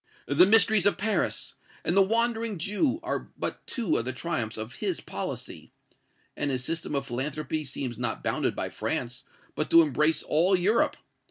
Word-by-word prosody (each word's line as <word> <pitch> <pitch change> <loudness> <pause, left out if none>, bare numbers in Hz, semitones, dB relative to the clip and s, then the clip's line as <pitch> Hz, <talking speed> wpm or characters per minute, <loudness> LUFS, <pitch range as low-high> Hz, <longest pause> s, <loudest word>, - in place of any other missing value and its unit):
'The 160 +6 +5
Mysteries 215 -2 +5
of 205 - +2
Paris' 215 +2 -1 0.3
and 175 - 0
'The 195 - +7
Wandering 225 +1 +1
Jew' 210 - 0
are 340 - -3
but - - -4
two 225 -10 0
of 115 - -2
the 130 - -2
triumphs 125 -6 -3
of 110 +2 -6
his - - -2
policy. - - -7 0.6
And 145 - -1
his 130 -2 -1
system 160 +1 -3
of 140 - -1
philanthropy 150 +5 -3
seems 130 -3 -5
not - - -2
bounded - - 0
by - - -3
France, 125 +1 -3 0.3
but 155 - -2
to 165 0 +8
embrace 155 +2 +1
all 175 +5 +3
Europe. 205 +6 +2
165 Hz, 170 wpm, -27 LUFS, 135-205 Hz, 0.6 s, to